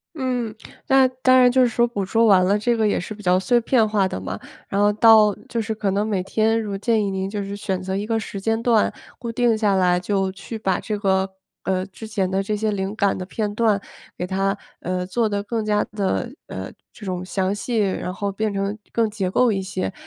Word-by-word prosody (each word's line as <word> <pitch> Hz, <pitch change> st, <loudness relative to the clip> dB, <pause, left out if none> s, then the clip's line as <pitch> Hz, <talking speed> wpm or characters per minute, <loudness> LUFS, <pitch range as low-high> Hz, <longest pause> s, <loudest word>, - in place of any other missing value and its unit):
嗯， 250 Hz, -6 st, -2 dB, 0.3 s
那 265 Hz, -1 st, +5 dB
当 255 Hz, 0 st, +3 dB
然 250 Hz, -1 st, +6 dB
就 260 Hz, +1 st, +4 dB
是 250 Hz, -, +4 dB
说 235 Hz, +1 st, +2 dB
捕 205 Hz, -5 st, -3 dB
捉 225 Hz, +4 st, +2 dB
完 190 Hz, -4 st, +6 dB
了 200 Hz, +3 st, +2 dB
这 235 Hz, +3 st, +1 dB
个 220 Hz, -1 st, +2 dB
也 205 Hz, -, +1 dB
是 215 Hz, +5 st, -6 dB
比 210 Hz, -, -12 dB
较 180 Hz, -1 st, +3 dB
碎 240 Hz, +5 st, +3 dB
片 230 Hz, -1 st, +3 dB
化 205 Hz, -2 st, +2 dB
的 140 Hz, -, -4 dB
嘛， 95 Hz, +1 st, -5 dB, 0.3 s
然 200 Hz, -, 0 dB
后 205 Hz, 0 st, +4 dB
到 215 Hz, -1 st, +6 dB
就 235 Hz, -, -2 dB
是 220 Hz, +1 st, -3 dB
可 205 Hz, -2 st, -1 dB
能 205 Hz, +2 st, 0 dB
每 200 Hz, -4 st, 0 dB
天 220 Hz, +4 st, +1 dB
如 205 Hz, -3 st, -3 dB
建 220 Hz, +2 st, +1 dB
议 200 Hz, -, -1 dB
您 190 Hz, 0 st, -3 dB
就 205 Hz, -1 st, -3 dB
是 200 Hz, +1 st, -5 dB
选 190 Hz, -2 st, -3 dB
择 190 Hz, +1 st, -3 dB
一 205 Hz, +1 st, -2 dB
个 225 Hz, 0 st, 0 dB
时 205 Hz, -, -6 dB
间 225 Hz, +3 st, 0 dB
段 230 Hz, -3 st, +3 dB, 0.3 s
固 235 Hz, -2 st, -5 dB
定 235 Hz, -1 st, +2 dB
下 210 Hz, -2 st, +2 dB
来 180 Hz, -2 st, +3 dB
就 195 Hz, +1 st, 0 dB
去 220 Hz, +4 st, -7 dB
把 190 Hz, -4 st, 0 dB
这 210 Hz, -1 st, -3 dB
个 190 Hz, -1 st, +1 dB, 0.3 s
呃， 185 Hz, 0 st, 0 dB
之 200 Hz, +3 st, -10 dB
前 200 Hz, -3 st, 0 dB
的 190 Hz, +1 st, +1 dB
这 210 Hz, +2 st, -2 dB
些 215 Hz, +1 st, 0 dB
灵 195 Hz, -1 st, -2 dB
感 200 Hz, -2 st, +2 dB
的 185 Hz, -, -5 dB
片 205 Hz, +2 st, -3 dB
段 215 Hz, -2 st, +2 dB, 0.4 s
给 180 Hz, -, -2 dB
它 195 Hz, +2 st, 0 dB, 0.2 s
呃， 180 Hz, +1 st, -2 dB
做 220 Hz, +4 st, 0 dB
得 205 Hz, -1 st, -2 dB
更 225 Hz, +1 st, -2 dB
加 210 Hz, -1 st, +1 dB
地， 210 Hz, +4 st, -2 dB
呃， -, -, -6 dB, 0.2 s
这 210 Hz, -, -11 dB
种 180 Hz, -1 st, -3 dB
详 190 Hz, +1 st, -1 dB
细， 230 Hz, +3 st, -2 dB
然 190 Hz, -3 st, -1 dB
后 200 Hz, +1 st, -3 dB
变 215 Hz, +1 st, -1 dB
成 200 Hz, +1 st, -2 dB
更 230 Hz, -1 st, +1 dB
结 200 Hz, -3 st, -2 dB
构 240 Hz, +4 st, +3 dB
一 195 Hz, -1 st, -1 dB
些。 190 Hz, 0 st, -3 dB
205 Hz, 255 characters per minute, -22 LUFS, 190-225 Hz, 0.4 s, 然